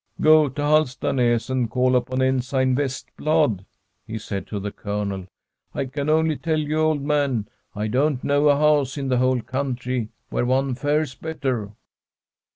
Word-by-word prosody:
' - - -33
Go 155 -1 +6
to 145 +3 -5
Halstanas 130 -5 +1
and 125 -3 0
call 125 +2 +2
upon 130 +1 0
Ensign 130 0 +1
Vest 135 0 -3
blad,' 150 - +1 0.4
he 110 - -4
said 100 -3 -5
to 105 - -4
the 100 +1 -4
Colonel. 100 -3 -4 0.2
* - - -35
I 140 - -1
can 140 +3 -3
only 160 -1 +2
tell 160 -1 -1
you, 155 0 -1
old 155 -2 +1
man, 140 -7 0 0.3
I 105 +1 -2
don't 130 +3 +1
know 145 +1 +3
a 145 - +5
house 150 -2 +2
in 135 -2 -3
the 125 - +2
whole 130 -1 +2
coun 130 +1 -2
try 125 -2 -3 0.2
where - - 0
one 135 +1 +1
fares 145 +1 0
better.' 130 -8 -3
130 Hz, 175 wpm, -23 LUFS, 120-150 Hz, 0.4 s, Go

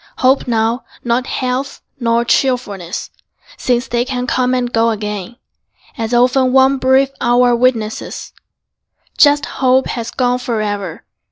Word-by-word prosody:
Hope 260 +1 +2
now, 230 +1 0 0.2
not 240 +2 0
health 260 +2 -3 0.2
nor 235 -1 +1
cheerfulness, 205 -10 -1 0.4
Since 245 0 -1
they 240 0 0
can 250 -1 -3
come 255 0 +1
and 245 -1 -2
go 230 0 +3
again, 210 0 -4 0.6
As 225 -4 -4
often 255 +1 +3
one 265 +1 +4
brief 265 +1 +3
hour 245 0 +3
witnesses, 235 -3 -1 0.8
Just 290 0 +4
hope 260 0 +1
has 235 -1 -4
gone 250 0 0
forever. 210 -7 -3
245 Hz, 125 wpm, -16 LUFS, 230-255 Hz, 0.8 s, one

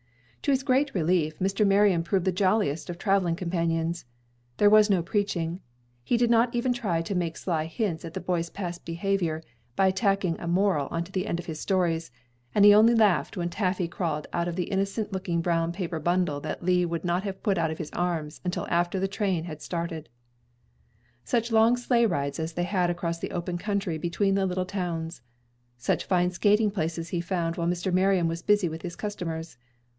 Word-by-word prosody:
To - - -2
his 270 -1 +2
great 275 0 +1
relief, 160 -3 +1
Mr. 195 +2 +1
Marion 195 -3 +4
proved 185 +2 0
the 190 - +3
jolliest 185 -4 +1
of 175 - -5
traveling 195 -3 +1
companions. 170 -2 -1 0.5
There 205 0 +5
was 215 0 +6
no 185 -4 +3
preaching. 180 -3 -1 0.4
He 240 - +1
did 240 0 +2
not 235 +1 +3
even 245 +1 +1
try 185 -9 -1
to 180 - -3
make 170 -3 -2
sly 160 -4 -1
hints 165 0 -2
at 165 -1 -8
the - - -2
boy's 170 -2 -1
past 175 -2 -6
behavior 170 -2 -1 0.3
by 190 -1 +4
tacking 195 -3 0
a 170 - -6
moral 175 -5 +2
on 165 0 -2
to 175 - -13
the 190 +1 -2
end 170 - -1
of 175 - -6
his 155 -2 -6
stories, 170 -4 0 0.5
and 205 - +6
he 205 - +9
only 225 +3 +6
laughed 210 -4 +2
when 175 -1 -1
Taffy 185 -1 0
crawled 165 -3 -3
out 170 0 0
of 175 - -3
the 180 - 0
innocent 200 +2 -1
looking 180 -3 -1
brown 165 0 0
paper 170 -2 -4
bundle 175 -2 0
that - - -5
Lee 180 -1 +3
would 170 0 -3
not 175 +2 0 0.2
put 195 -4 +1
out 165 -1 +1
of 160 - -4
his 155 - -6
arms 165 -4 -2
until 180 -1 -2
after 175 +2 +1
the 195 - +1
train 195 -4 -1
had 155 -3 -7
started. 165 -2 -4 1.1
Such 235 -1 0
long 225 +2 +5
sleigh 240 -1 +2
rides 140 -6 -2
as 160 +1 -3
they 175 - -1
had 180 -1 +1
across 170 -1 -2
the - - -4
open 175 0 -3
country 200 -5 -2
between 195 +4 0
little 185 -2 0
towns! 175 -4 -4 0.6
Such 120 - -1
fine 180 -1 +2
skating 210 +3 +3
places 165 -3 -3
he 175 - -1
found 170 -2 -2
while 170 -1 -1
Mr. 175 +1 -1
Marion 185 -2 +3
was 165 +1 -3
busy 205 -3 +3
with 160 0 -6
his 175 -2 -6
customers! 165 -7 -5
180 Hz, 200 wpm, -27 LUFS, 165-200 Hz, 1.1 s, he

